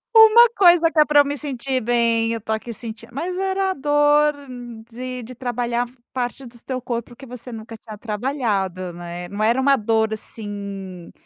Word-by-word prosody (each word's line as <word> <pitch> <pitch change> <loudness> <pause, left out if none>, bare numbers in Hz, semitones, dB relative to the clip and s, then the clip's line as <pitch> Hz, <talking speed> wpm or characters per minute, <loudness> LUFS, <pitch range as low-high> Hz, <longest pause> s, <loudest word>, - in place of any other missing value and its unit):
Uma 445 +2 +9
coisa 345 -3 +6
que 315 - +1
é 300 - +7
para 295 -1 +6
eu - - 0
me 285 +1 -2
sentir 265 -2 -3
bem, 230 -1 +2
eu 230 - -1
estou 220 0 -3
aqui 220 +2 -4
sentindo, 225 0 -8
mas 335 +8 -3
era 385 0 0
a - - -1
dor 295 +1 +3 0.6
de 250 +1 -6
de 255 - -9
trabalhar 245 -1 -2 0.3
parte 255 +1 -3
do 235 -1 -14
teu 260 -1 -3
corpo 240 -1 -5
que 270 - -12
você 250 0 -9
nunca 225 0 -8
tinha 220 -1 -11
trabalhado, 210 -6 -2
né. 175 0 -7
Não 205 +1 -3
era 235 +4 +3
uma 275 +1 +4
dor, 220 -1 +1
assim, 200 -4 -7
240 Hz, 185 wpm, -22 LUFS, 220-285 Hz, 0.6 s, Uma